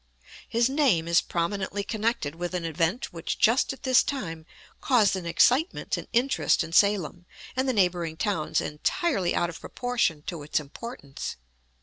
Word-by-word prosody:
His 235 +1 +2
name 260 - +2
is 170 0 +4
prominently 195 +3 -2
connected 215 -8 -1
with 175 +2 -4
an 175 -2 -2
event 165 +8 -1
which 165 -1 -4
just 230 +4 +3
at 270 - -10
this 260 -2 +5
time 165 - -4 0.3
caused 225 -8 +3
an 180 -2 -5
excitement 255 - +2
and - - -7
interest 250 +3 +2
in 165 - -8
Salem 180 -3 +2 0.3
and 260 +1 0
the - - +2
neighboring 175 -5 +1
towns 160 -7 0
entirely 190 - 0
out 175 0 0
of 165 - -10
proportion 235 - -1
to 170 -2 -5
its 145 +1 0
importance. 145 - -7
185 Hz, 155 wpm, -26 LUFS, 165-240 Hz, 0.3 s, this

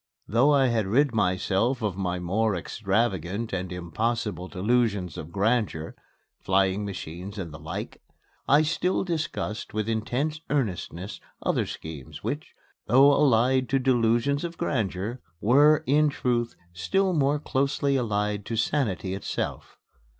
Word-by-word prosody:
Though 125 +7 +4
I 135 -3 +4
had 110 -4 0
rid 130 +5 +3
myself 105 +5 +1
of 100 -4 -1
my 90 -2 -2
more 100 +4 0
extravagant 100 +2 -1
and 90 -1 -3
impossible 95 +3 -2
delusions 100 -3 0
of 80 - -7
grandeur 100 -5 0 0.5
flying 95 +1 +1
machines 95 +1 -6
and 85 -6 -5
the 80 - -9
like 80 +2 -6 0.5
I 145 +3 +5
still 170 +4 0
discussed 155 - -3
with 110 0 -1
intense 125 +8 -1
earnestness 100 - -2 0.2
other - - +1
schemes, 80 -5 -8
which, - - -4 0.3
though 135 +5 +6
allied 130 -1 +3
to 135 - +3
delusions 125 +2 +2
of 170 -1 -5
grandeur, 115 - -2 0.2
were, 145 +7 +5
in 150 +2 +4
truth, 120 -4 -1 0.2
still 190 - +1
more 145 -2 +2
closely 140 0 0
allied 105 -4 0
to 115 - -2
sanity 110 - 0
itself. 95 - -4
115 Hz, 130 wpm, -26 LUFS, 95-135 Hz, 0.5 s, though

